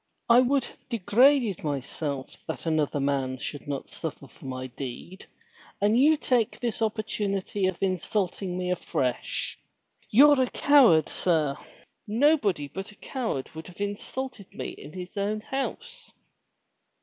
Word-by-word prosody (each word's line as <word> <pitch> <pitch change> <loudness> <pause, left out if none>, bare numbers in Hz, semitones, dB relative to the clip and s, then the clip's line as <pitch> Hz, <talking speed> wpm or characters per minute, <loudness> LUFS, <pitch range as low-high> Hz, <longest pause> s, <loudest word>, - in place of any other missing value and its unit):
I 235 +1 +7
would 260 +1 +3
have - - -16
degraded 235 - +3
myself 140 -1 -3
that - - -5
another 155 -3 +1
man 135 -2 0
should 145 +3 -6
not 140 -2 -4
suffer 145 -4 -6
for 135 - -16
my 130 -1 -4
deed, 135 - -8 0.5
and 205 +2 +3
you 305 +3 +5
take 245 -6 +1
this 235 -1 -2
opportunity 205 -3 -1
of 185 -2 -2
insulting 185 -1 -1
me 180 0 -1
afresh. 130 -8 -2 0.5
You're 285 +4 +7
a 255 - +1
coward, 250 - +5
sir. 155 -6 +1 0.5
Nobody 220 - +2
but 195 +7 -7
a - - -17
coward 225 - -4
would 160 +1 -8
have 180 0 -14
insulted 205 +2 -4
me - - -5
in 145 - -10
his 180 -1 -8
own 210 +2 -1
house." 450 - -5
195 Hz, 135 wpm, -27 LUFS, 150-240 Hz, 0.5 s, I